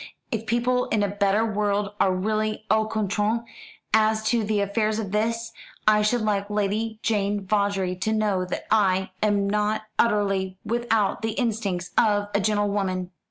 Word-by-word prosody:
"If 225 -1 -3
people 245 +2 +1
in 215 -2 0
a - - +2
better 200 +2 +1
world 205 -1 -1
are 190 - +4
really 215 +3 -1
au 220 0 +3
courant 215 +1 0 0.5
as 220 0 +3
to 235 -1 +2
the 210 0 0
affairs 215 +2 0
of 210 -4 -4
this, 230 +2 -1 0.4
I 210 0 +5
should 220 +3 +1
like 205 -1 0
Lady 210 +2 -1
Jane 205 -2 0
Vawdrey 200 -2 0
to 205 +4 -1
know 210 -4 +1
that 180 - -5
I 190 -3 +2
am 205 -2 +2
not 210 +1 0 0.2
utterly 195 -4 +1
without 225 -2 0
the 225 -1 -1
instincts 210 -7 -2
of 205 -2 +2
a 200 - +3
gentlewoman." 200 -3 0
210 Hz, 160 wpm, -25 LUFS, 200-220 Hz, 0.5 s, I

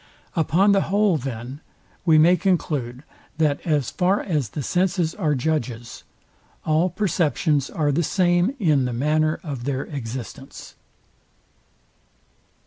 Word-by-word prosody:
Upon 180 +4 +3
the 195 -1 +4
whole, 200 -2 +3
then, 130 +1 -6 0.4
we 160 -3 +5
may 170 +4 +6
conclude, 150 -10 -1 0.3
that 150 -3 +1
as 145 -6 +1
far 190 +2 +1
as 150 - -2
the 145 - -5
senses 180 0 0
are 150 -2 0
judges, 125 -5 -3 0.6
all 160 +4 +2
perceptions 160 -6 0
are 150 -2 0
the 155 +5 +1
same 175 - +1
in 155 - +2
the 125 - -2
manner 155 +5 +1
of 140 -7 -6
their 135 -1 -1
existence. 130 -1 -8
155 Hz, 125 wpm, -23 LUFS, 135-175 Hz, 0.6 s, may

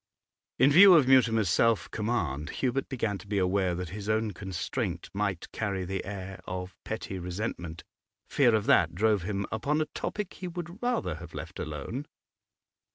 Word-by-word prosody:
In 135 +4 +5
view 185 +4 +9
of 150 -6 +5
Mutimer's 115 -5 +4
self 115 +5 +2
command, 105 - -2
Hubert 130 +1 -1
began 110 -7 -2
to 105 - -13
be 100 0 -1
aware 95 -1 +1
that 90 -1 -4
his 105 +1 -6
own 110 0 +1
constraint 95 -3 -4
might 100 -3 -2
carry 100 -4 -2
the 95 +1 -3
air 95 -1 -6
of 90 -1 -5
petty 95 - -5
resentment 90 -2 -5 0.4
Fear 120 -5 +4
of 110 - 0
that - - +4
drove 105 +1 +2
him 100 +2 -2
upon 140 +8 0
a 155 - +1
topic 205 +5 -4
he 185 - -6
would 175 +3 -7
rather 240 - -1
have 80 +1 -11
left - - -7
alone. 80 - -5
105 Hz, 165 wpm, -29 LUFS, 90-130 Hz, 0.4 s, view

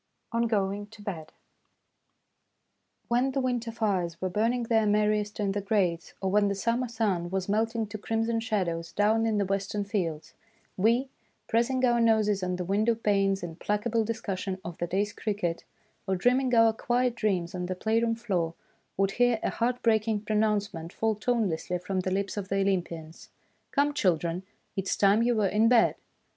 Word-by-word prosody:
ON 235 0 +1
GOING 205 -2 -1
TO 210 0 -14
BED 165 -7 -6 1.8
WHEN 250 +3 +1
the 275 - 0
winter 245 -3 -1
fires 190 -7 -1
were 185 -1 -2
burning 230 +5 +1
their 225 -2 +2
merriest 210 0 +1
in 200 -2 +1
the 205 +1 -2
grates, 190 -5 0
or 190 -1 -1
when 205 0 +4
the 200 - 0
summer 235 +5 0
sun 205 -7 -1
was 190 0 -2
melting 225 +2 0
to 210 0 -7
crimson 225 +2 0
shadows 180 -7 -2
down 220 +2 +2
in 220 -1 +1
the 200 - +1
western 195 +1 -1
fields, 180 -7 -3 0.4
we, 235 +7 +2 0.4
pressing 255 +3 +2
our 240 -1 +3
noses 215 -3 +3
on 180 0 -1
the 180 0 -4
window 215 +5 +2
panes 195 -3 +1
in 165 -2 -5
placable 215 +4 0
discussion 200 -4 -3
of 170 -1 -5
the 175 - -1
day's 200 +4 -1
cricket, 200 -6 -2 0.4
or 190 - +1
dreaming 250 +5 +2
our 225 -1 +6
quiet 245 +2 0
dreams 190 -6 -1
on 180 -1 -3
the 185 - -3
playroom 230 +3 +1
floor, 180 -8 -2 0.4
would 195 0 +2
hear 245 0 +2
a - - 0
heart 245 +1 -1
breaking 220 -1 +2
pronouncement 210 -5 -1
fall 220 +1 0
tone 230 +1 0
lessly 175 +1 -3
from 185 +1 -2
the 185 - -1
lips 195 +2 -2
of 200 -1 -4
the 195 0 +1
Olympians: 170 -4 -3 0.2
" - - -43
Come, 290 +1 +2
children, 175 - +1 0.3
it 195 -1 -2
is - - 0
time 200 +2 +4
you 240 0 +2
were 215 -2 +2
in 215 +4 +3
bed 235 -1 +5
210 Hz, 180 wpm, -28 LUFS, 190-230 Hz, 1.8 s, our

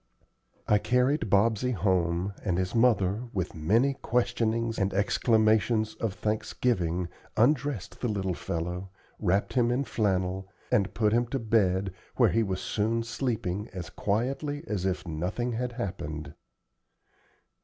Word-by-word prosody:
I 105 - +4
carried 125 +1 +1
Bobsey 110 +5 +3
home, 90 -1 +1
and 90 -4 0
his 90 0 -1
mother, 115 -2 +3
with 95 -2 -2
many 110 - +2
questionings 115 -2 0
and 95 -1 0
exclamations 110 +1 +2
of 110 -4 -3
thanksgiving, 95 -5 0 0.3
undressed 130 -3 +1
the 125 - 0
little 95 -4 -1
fellow, 90 +3 -4 0.3
wrapped 100 0 +1
him 120 -2 +3
in 125 +3 +1
flannel, 95 -5 -1 0.2
and 100 -2 +2
put 105 -1 +2
him 120 +1 +2
to 135 - -2
bed, 100 -5 +1 0.2
where - - +4
he 115 - +2
was 95 -4 -2
soon 115 +2 0
sleeping 110 -5 -2
as 90 -1 -6
quietly 135 +8 -1
as 95 - -1
if 95 -1 -2
nothing 90 +10 -2
had 120 +1 -2
happened. 80 - -5
105 Hz, 135 wpm, -28 LUFS, 95-115 Hz, 0.3 s, I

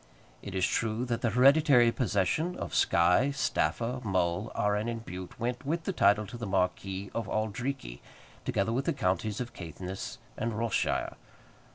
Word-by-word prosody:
It - - -7
is 95 0 +2
true 115 +2 0
that 120 -2 -2
the 120 - +2
hereditary 130 0 +6
possession 125 - 0
of - - -6
Skye, 90 +11 +4
Staffa, 125 -2 0
Mull, 95 +1 0
Arran, 105 +2 +1
and 115 -1 -5
Bute 90 0 -8
went, 120 +2 -2
with 165 +4 -1
the 195 - -2
title, 105 - +4
to 120 - -8
the 115 -2 -5
Marquis 95 +1 -1
of 115 -3 -3
Auldreekie, 110 - -3 0.4
together 100 +3 0
with 130 +3 -1
the - - +1
counties 100 - -1
of 120 -1 -5
Caithness 90 +2 -6 0.2
and 115 -1 -2
Ross 115 -1 -1
shire. - - 0
110 Hz, 165 wpm, -30 LUFS, 95-125 Hz, 0.4 s, hereditary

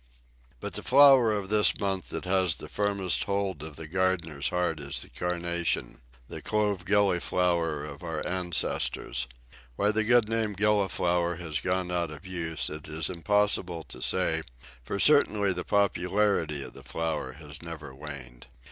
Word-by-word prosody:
But - - -5
the - - -4
flower 135 -4 +7
of 100 -2 -2
this 105 0 +4
month 95 -3 -2
that - - -5
has 95 -3 +2
the - - -10
firmest 100 -3 0
hold 100 -5 -2
of 80 -1 -8
the 80 - -8
gardener's 85 -5 0
heart 90 -3 -1
is 70 -1 -3
the - - -10
Carnation 85 -8 -1 0.3
the - - -8
Clove 105 -4 0
Gilliflower 90 -5 +1
of 70 -1 -9
our 80 -3 -4
ancestors. 90 -8 0 0.5
Why 105 +7 +2
the 110 +1 +1
good 120 0 +4
old - - -8
name 110 -2 0
"Gilliflower" 95 -4 +1
has 80 -4 -4
gone 90 +1 -1
out 85 -2 -1
of 75 +5 -11
use 85 -4 -2
it 75 0 -7
is 80 +2 -2
impossible 90 -2 +1
to - - -9
say, 80 -3 +1 0.4
for 100 - -4
certainly 105 -7 +4
the - - -4
popularity 95 -6 +1
of - - -10
the - - -12
flower 80 -5 -3
has 75 -1 -9
never 80 -5 -8
waned. 65 -4 -10
90 Hz, 160 wpm, -28 LUFS, 80-100 Hz, 0.5 s, flower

